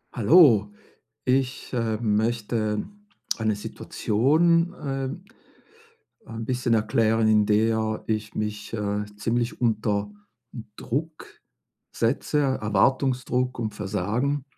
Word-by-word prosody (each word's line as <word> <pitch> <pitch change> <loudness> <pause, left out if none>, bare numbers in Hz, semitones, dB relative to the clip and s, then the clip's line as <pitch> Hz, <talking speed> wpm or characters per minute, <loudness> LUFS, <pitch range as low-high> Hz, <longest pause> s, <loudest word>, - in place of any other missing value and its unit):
Hallo. 115 - +5 0.6
Ich, 130 0 0
ähm, 110 -2 0
möchte 110 -1 -1 0.5
eine 110 -1 0
Situation 160 - +1
äh, 135 -4 -4 1.2
ein 115 0 -6
bisschen 125 -1 0
erklären, 110 0 +2
in 105 -1 +4
der 110 +1 +1
ich 110 -1 -2
mich, 105 0 -4
äh, 105 -1 -2
ziemlich 115 +4 -2
unter 105 -3 0 0.7
Druck 155 +5 -4 0.7
setze, 135 +5 0
Erwartungsdruck 125 +1 +1
und 110 -3 -3
Versagen 110 +8 -1
115 Hz, 90 wpm, -25 LUFS, 105-130 Hz, 1.2 s, Hallo